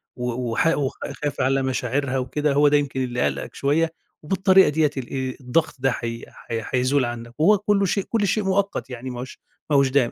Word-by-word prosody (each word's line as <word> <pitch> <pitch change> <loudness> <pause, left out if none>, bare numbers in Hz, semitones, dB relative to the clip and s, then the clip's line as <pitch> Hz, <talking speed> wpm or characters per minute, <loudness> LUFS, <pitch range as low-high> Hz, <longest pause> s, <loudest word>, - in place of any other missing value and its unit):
و 125 -1 -3
وحا 165 +8 +2
وخا 140 -2 -3
خايف 145 -3 -3
على 135 +1 +2
مشاعرها 130 +1 -1
وكده، 145 +3 0
هو 145 +1 +5
ده 145 0 +5
يمكن 140 -2 -1
اللي 125 -1 -2
قالقَك - - -2
شوية، 160 +4 +1 0.3
وبالطريقة 190 +3 +4
ديّة 150 0 +2
ال 130 -2 -5 0.2
آآ، 130 - -8
الضغط 130 +6 0
ده 135 0 +1
هي 115 0 -4 0.2
هي 115 -1 -3
هيزول 130 +1 +2
عنك، 120 0 -6
وهو 205 +7 +5
كله 205 0 +1
شيء 195 +1 0
كله 225 -3 +1
شيء 210 +2 +1
مؤقت 195 -5 -1
يعني 125 0 -6
ما 125 -1 -6
هوش 130 +1 -8 0.3
ما 150 - +2
هوش 140 -1 +4
دايم، 130 -3 +2
140 Hz, 210 wpm, -23 LUFS, 125-160 Hz, 0.3 s, هو